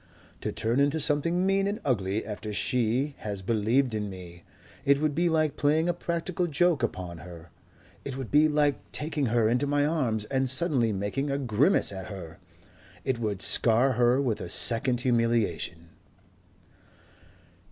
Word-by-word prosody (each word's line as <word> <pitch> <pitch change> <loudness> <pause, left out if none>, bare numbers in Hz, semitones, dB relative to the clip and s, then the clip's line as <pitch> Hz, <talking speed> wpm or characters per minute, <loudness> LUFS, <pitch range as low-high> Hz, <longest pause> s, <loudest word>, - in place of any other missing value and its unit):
"To - - -3
turn 115 +4 0
into 145 +3 +2
something 160 +5 +1
mean 195 0 +2
and 205 +2 -3
ugly 105 -5 -1
after 105 0 -6
she 125 +5 0
has 100 -3 -5
believed 115 +5 +1
in 105 -1 -3
me.... 90 -2 -11 0.4
It 140 0 +3
would 155 -1 0
be 170 +3 +1
like 155 -3 0
playing 155 +3 +2
a 175 - +1
practical 170 +1 -2
joke 170 -1 +2
upon 90 -7 -4
her. 85 0 -12 0.5
It 135 -2 -5
would 130 -4 -6
be 150 +2 +5
like 150 -2 +1
taking 150 -2 -2
her 115 -1 +2
into 125 +5 +1
my 145 0 +2
arms 125 -9 -1
and 130 +2 -1
suddenly 130 -4 +2
making 100 +8 -2
a 140 - 0
grimace 135 - +2
at 95 -2 -7
her.... 90 -4 -9 0.7
It 130 -3 -1
would 105 -4 -2
scar 120 +4 +3
her 125 +1 +3
with 125 -6 -1
a 85 - -6
second 120 +5 +2
humiliation...." 115 - 0
125 Hz, 160 wpm, -27 LUFS, 105-145 Hz, 0.7 s, be